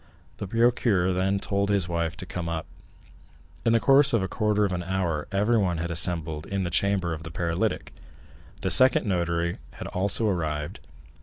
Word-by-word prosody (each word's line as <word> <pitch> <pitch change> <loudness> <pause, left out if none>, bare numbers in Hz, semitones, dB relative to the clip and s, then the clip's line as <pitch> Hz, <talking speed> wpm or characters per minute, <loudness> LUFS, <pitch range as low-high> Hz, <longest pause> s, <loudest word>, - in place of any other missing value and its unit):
The 100 - -6
procureur 115 -4 +1
then 95 +2 0
told 100 0 -1
his 100 -4 +1
wife 85 -1 -3
to - - -7
come 90 -2 -5
up. 80 -1 -4 1.0
In 115 - +2
the 115 - +3
course 135 +2 +4
of 115 -5 +2
a - - -2
quarter 105 0 0
of 100 - -3
an 90 -1 -3
hour 85 -4 -3
everyone 100 -3 +1
had 85 +1 -4
assembled 80 -2 +3
in 100 -1 -3
the 85 - -4
chamber 95 -2 0
of 80 - -7
the 80 - -8
paralytic; 85 0 -3 0.7
the - - -1
second 130 -1 +6
notary 85 -3 -2
had - - -9
also 100 +4 +1
arrived. 75 -6 -3
90 Hz, 175 wpm, -25 LUFS, 85-100 Hz, 1.0 s, second